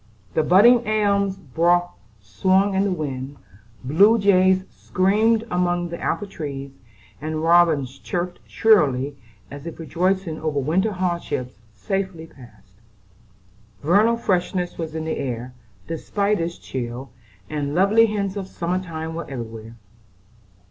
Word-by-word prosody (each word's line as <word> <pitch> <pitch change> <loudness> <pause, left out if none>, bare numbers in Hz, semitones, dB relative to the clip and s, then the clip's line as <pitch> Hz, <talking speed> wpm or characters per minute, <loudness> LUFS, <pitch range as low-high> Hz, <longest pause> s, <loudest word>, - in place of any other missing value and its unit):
The - - +2
budding 230 +8 +5
elm 200 -2 +2 0.3
boughs 175 +1 +3 0.3
swung 185 - +1
in 190 +1 +2
the 200 - 0
wind; 140 -4 -4 0.5
blue 195 - +5
jays 190 -2 +4
screamed 215 +4 +1
among 175 -1 0
the 170 - -7
apple 205 - -1
trees; 140 -7 -6 0.5
and 155 +1 -3
robins 160 -6 +3
chirped 175 0 -4
shrilly, 145 - +3 0.4
as 140 +3 -8
if 165 - -7
rejoicing 180 0 -1
over 155 -2 -1
winter 185 +10 +1
hardships 170 - -3 0.2
safely 190 - -3
passed. 105 -9 -18 1.0
Vernal 210 +9 +4
freshness 180 -3 -1
was 160 -2 -5
in 160 0 -3
the 160 - -2
air 125 -1 -4 0.3
despite 200 +5 -1
its 170 +1 -3
chill, 125 +1 -6 0.4
and 145 -1 -3
lovely 210 +5 +5
hints 200 -2 -2
of 195 -2 -4
summer 180 0 -2
time 160 -2 -6
were 170 +1 -6
everywhere. 115 -3 -7
170 Hz, 130 wpm, -22 LUFS, 145-195 Hz, 1.0 s, budding